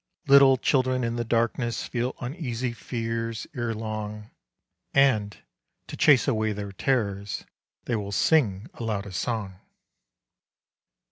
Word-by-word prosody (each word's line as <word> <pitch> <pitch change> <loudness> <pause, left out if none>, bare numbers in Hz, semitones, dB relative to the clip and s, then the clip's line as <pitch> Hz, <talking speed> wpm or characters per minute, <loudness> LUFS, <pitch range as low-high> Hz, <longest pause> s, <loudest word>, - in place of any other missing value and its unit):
Little 140 -2 +7
children 130 -1 +1
in 115 0 -1
the 120 - -1
darkness 115 0 0
Feel 125 +1 -2
uneasy 125 -3 -3
fears 115 0 -4
erelong, 110 -2 -4 0.6
And, 110 -7 +3 0.5
to - - -8
chase 145 -3 +5
away 110 -4 +1
their 100 -1 -5
terrors, 100 -3 -1 0.4
They 120 - 0
will 100 -2 -3
sing 105 -3 +2
aloud 110 -4 -3
a 100 - -8
song. 95 0 -3
115 Hz, 115 wpm, -26 LUFS, 105-125 Hz, 0.6 s, Little